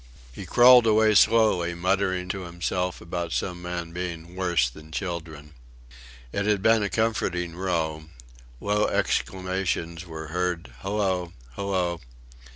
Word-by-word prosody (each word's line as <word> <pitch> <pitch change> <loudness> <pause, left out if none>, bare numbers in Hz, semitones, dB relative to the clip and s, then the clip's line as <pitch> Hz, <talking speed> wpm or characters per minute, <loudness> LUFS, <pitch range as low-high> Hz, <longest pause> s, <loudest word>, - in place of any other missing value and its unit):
He - - -8
crawled 125 -1 +7
away 110 0 +4
slowly, 100 -6 +4
muttering 95 +1 0
to 95 +1 -3
himself 90 +1 -3
about 85 -1 -4
some 90 -2 -2
men 90 -1 -5
being 85 -1 -6
"worse 85 -8 +2
than 75 +5 -12
children." 80 -4 -5 0.8
It 100 +7 -1
had 105 -2 +1
been 110 0 +5
a 100 - 0
comforting 90 -7 -1
row. 80 -4 -2 0.5
Low 105 +4 +1
exclamations 95 -2 -1
were 80 -1 -7
heard: 90 -6 -2
"Hallo... 95 0 -1 0.2
Hallo."... 90 -4 -1
90 Hz, 125 wpm, -25 LUFS, 85-100 Hz, 0.8 s, crawled